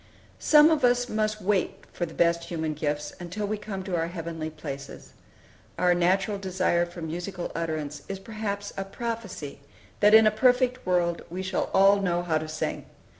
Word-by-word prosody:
Some 300 +1 +6
of 310 -3 +1
us 245 0 +3
must 215 -1 -1
wait 195 -1 0
for 175 - -2
the 160 - -12
best 170 0 +2
human 160 -2 -3
gifts 150 0 -3
until 180 +4 -4
we 210 +1 -1
come 195 -3 -5
to 185 -3 -2
heavenly 165 -2 -5
places. 140 -3 -8 0.6
Our 180 0 +4
natural 190 +4 +1
desire 185 -2 +1
for 175 -1 -9
musical 175 +3 -5
utterance 155 -3 -3
is 195 - -3
perhaps 205 -1 -5
a 195 - -2
prophecy 195 -8 -5 0.4
that 210 +1 +7
in 220 0 +8
a 215 - +5
perfect 250 +1 +2
world 175 -2 +1
we 185 +3 -4
shall 190 0 -1
all 195 +1 +5
know 175 -2 0
how 160 -3 +1
to 155 - -6
sing. 155 0 -4
185 Hz, 175 wpm, -27 LUFS, 170-210 Hz, 0.6 s, in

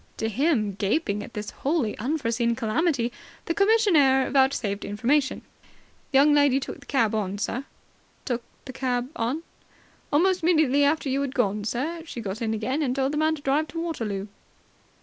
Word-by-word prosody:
To 220 - -1
him, 235 -3 +1
gaping 205 - -1
at 235 - -10
this 210 0 -5
wholly 275 -7 -1
unforeseen 235 -3 0
calamity 245 +2 0 0.3
the 335 - 0
commissionaire 345 - +4
vouchsafed 265 -7 +1
information. 260 +6 0 0.7
"The 270 - +4
young 290 +2 +6
lady 285 -2 +4
took - - -7
the - - -17
cab 230 -6 +1
on, 200 -2 -2
sir." 245 +6 -3 0.6
"Took 245 -2 -1 0.2
the 260 - -8
cab 255 -1 -1
on?" 255 +7 -2 0.7
"Almost 370 +5 +3
immediately 310 -5 +3
after 290 +1 +1
you 270 +1 0
had 275 -1 -3
gone, 210 -4 0
sir, 300 +10 -2
she 285 - -7
got 210 0 -5
in 225 -1 0
again 255 +8 -1
and 255 -4 0
told 270 0 0
the 300 - -2
man 315 +1 +2
to 285 - -13
drive 290 +3 +1
to 325 +3 -6
Waterloo." 225 - -3
265 Hz, 170 wpm, -25 LUFS, 230-300 Hz, 0.7 s, young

